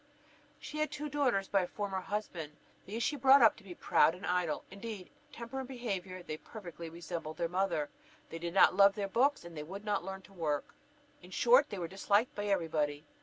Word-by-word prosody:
She 305 - -6
had 305 - +1
two 300 0 -5
daughters 255 -9 +1
by 195 - +3
a 180 - -2
former 195 -2 -3
husband. 185 -6 -4 0.3
These 225 +4 -3
she 295 - +1
brought 270 0 +7
up 225 - +7
to 215 - -15
be 185 -3 -9
proud 165 - +3
and 185 - -8
idle. 180 -3 0
Indeed, 200 -1 -7 0.2
in - - -33
temper 235 +3 -6
and 260 - -5
behaviour 195 -8 -4
they 155 -2 -5
perfectly 170 -4 -9
resembled 165 -1 -6
their 170 - 0
mother; 180 -4 0 0.4
they 165 - -5
did 170 +1 -4
not 195 - +7
love 200 0 +6
their 205 -2 -2
books, 260 +4 +2
and 170 -1 -10
would 200 +4 -7
not 205 -3 0
learn 190 +1 -6
to 195 - -17
work; 155 -5 -2 0.5
in 180 - -14
short 250 +8 +5
they 205 - -5
were 175 -2 -3
disliked 200 +5 +1
by 205 - -4
every 195 -5 +1
body. 150 -1 -1
195 Hz, 215 wpm, -33 LUFS, 170-225 Hz, 0.5 s, brought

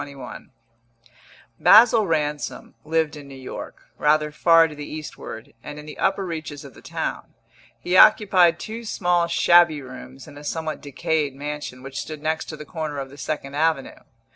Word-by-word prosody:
BOOK - - -9
SECOND 135 -3 -10
XXI 115 0 -35 0.5
Basil 220 -1 +7
Ransom 150 -2 -2
lived 160 0 0
in 145 -2 -11
New 135 - -11
York, 130 -1 -9 0.2
rather 150 0 +2
far 165 +1 +5
to 155 - -10
the 150 0 -8
eastward, 150 -7 -8
and 150 +3 -8
in 150 - -9
the 150 - -10
upper 195 0 +1
reaches 160 -4 -6
of - - -12
the - - -16
town; - - -5 0.4
he 175 +9 -1
occupied 185 -5 +6
two 225 +2 -7
small 175 -5 +1
shabby 170 -2 +4
rooms 130 +1 -11
in 145 -1 -12
a - - -12
somewhat 160 +1 -4
decayed 145 0 -2
mansion 145 -3 -6
which 135 0 -6
stood 155 -1 -8
next 160 +1 -1
to 155 - -8
the 150 - -9
corner 155 -2 -5
of 135 -1 -5
the 140 - -13
Second 140 -3 -4
Avenue. 155 -2 0
155 Hz, 180 wpm, -23 LUFS, 140-165 Hz, 0.5 s, Basil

